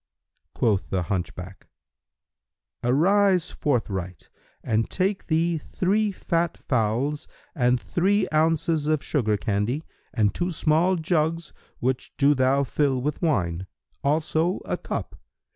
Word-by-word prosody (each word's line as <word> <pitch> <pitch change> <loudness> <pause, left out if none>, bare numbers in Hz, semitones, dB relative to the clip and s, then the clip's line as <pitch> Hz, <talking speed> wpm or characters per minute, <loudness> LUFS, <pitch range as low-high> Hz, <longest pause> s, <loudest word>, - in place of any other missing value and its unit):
Quoth 105 -4 +1
the 95 -2 0
hunchback, 90 +1 -5 1.2
"Arise 180 +8 +3
forthright 95 - -2 0.3
and 110 0 0
take 195 +1 -1
thee 165 0 +1
three 205 +7 0
fat 170 -3 -1
fowls 125 +5 -1 0.3
and 125 -4 +2
three 195 - +1
ounces[FN#314] 155 -1 +2
of 155 - -1
sugar 110 -8 0
candy 105 - -1 0.3
and 105 -2 +1
two 175 +1 -1
small 165 +2 +2
jugs 165 -1 -1 0.2
which 130 +1 -2
do 145 +1 +5
thou 135 +1 +2
fill 135 -1 0
with 150 +4 -3
wine; 95 - 0 0.4
also 160 +4 +1
a - - -1
cup. - - -5
150 Hz, 115 wpm, -25 LUFS, 115-170 Hz, 1.2 s, do